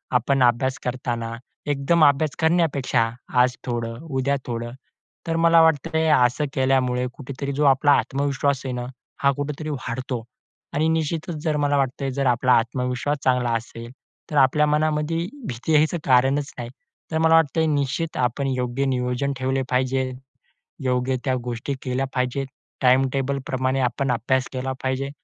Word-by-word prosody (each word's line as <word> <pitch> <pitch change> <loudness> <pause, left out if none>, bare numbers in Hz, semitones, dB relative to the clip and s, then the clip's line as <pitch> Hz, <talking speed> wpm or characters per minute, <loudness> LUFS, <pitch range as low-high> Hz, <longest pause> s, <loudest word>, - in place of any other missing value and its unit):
आपण 130 +2 +3
अभ्यास 125 +2 +2
करताना, 120 -2 -3 0.3
एकदम 145 +3 +2
अभ्यास 145 +1 +2
करण्यापेक्षा 145 -8 +2 0.3
आज 125 0 +2
थोडं, 115 -2 -3
उद्या 140 -3 -1
थोडं, 120 -1 -4 0.6
तर 165 - 0
मला 165 0 +7
वाटतं 160 -1 +2
आहे, 160 0 +2 0.2
असं 125 +5 0
केल्यामुळे 130 -2 +1
कुठेतरी 140 0 -6
जो 150 - +3
आपला 140 +1 +4
आत्मविश्वास 140 0 -1
आहे 130 - -2
ना, 120 0 -4 0.4
हा 140 - +5
कुठेतरी 150 +2 -4
वाढतो 130 -3 -4 0.5
आणि 155 +2 +1
निश्चितच, 160 +1 -1
जर 155 -2 0
मला 145 -1 +1
वाटतं 135 0 -1
आहे, 135 - -1
जर 140 +1 -1
आपला 125 +1 +3
आत्मविश्वास 125 +4 0
चांगला 125 -2 +2
असेल, 115 +1 -9 0.4
तर - - -3
आपल्या 140 +2 +4
मनामध्ये 150 +1 +1 0.3
भीती 125 +6 -2
यायचं 155 +3 +3
कारणच 135 +2 +3
नाही. 120 -1 -5 0.4
तर 160 - 0
मला 160 0 +5
वाटतंय, 160 0 +3
निश्चित 145 +4 -1
आपण 125 +3 0
योग्य 130 0 -1
नियोजन 125 +1 -1
ठेवले 130 +1 0
पाहिजे, 130 0 0 0.7
योग्य 130 0 0
त्या 130 -2 +1
गोष्टी 120 +3 -4
केल्या 130 +1 -1
पाहिजेत. 125 +2 -1 0.3
टाइम 130 +1 +4
टेबल 135 0 -1
प्रमाणे 130 0 0
आपण 130 +2 0
अभ्यास 125 +2 0
केला 130 +1 -3
पाहिजे 130 +1 -1
135 Hz, 150 wpm, -23 LUFS, 125-145 Hz, 0.7 s, मला